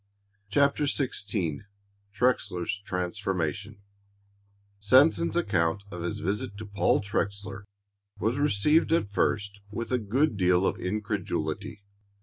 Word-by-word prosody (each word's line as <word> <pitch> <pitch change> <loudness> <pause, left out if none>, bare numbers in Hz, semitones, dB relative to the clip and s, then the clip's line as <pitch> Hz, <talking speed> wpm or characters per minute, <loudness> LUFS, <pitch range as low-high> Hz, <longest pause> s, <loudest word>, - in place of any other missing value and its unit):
CHAPTER 140 +5 +3
XVI 105 - -1 0.5
TREXLER'S 105 -4 0
TRANSFORMATION 95 +1 -3 1.0
Sanson's 135 +12 +4
account 90 - +1
of 90 - -6
his 85 - -3
visit 100 +2 -2
to 110 - -7
Paul 100 -1 +2
Trexler 100 -1 -3 0.5
was 115 +6 0
received 150 +4 +3
at 135 -12 +1
first 100 0 0
with 115 +4 -5
a 125 - +2
good 120 +4 +1
deal 90 0 +3
of - - 0
incredulity. 100 -1 -3
100 Hz, 110 wpm, -28 LUFS, 95-115 Hz, 1.0 s, Sanson's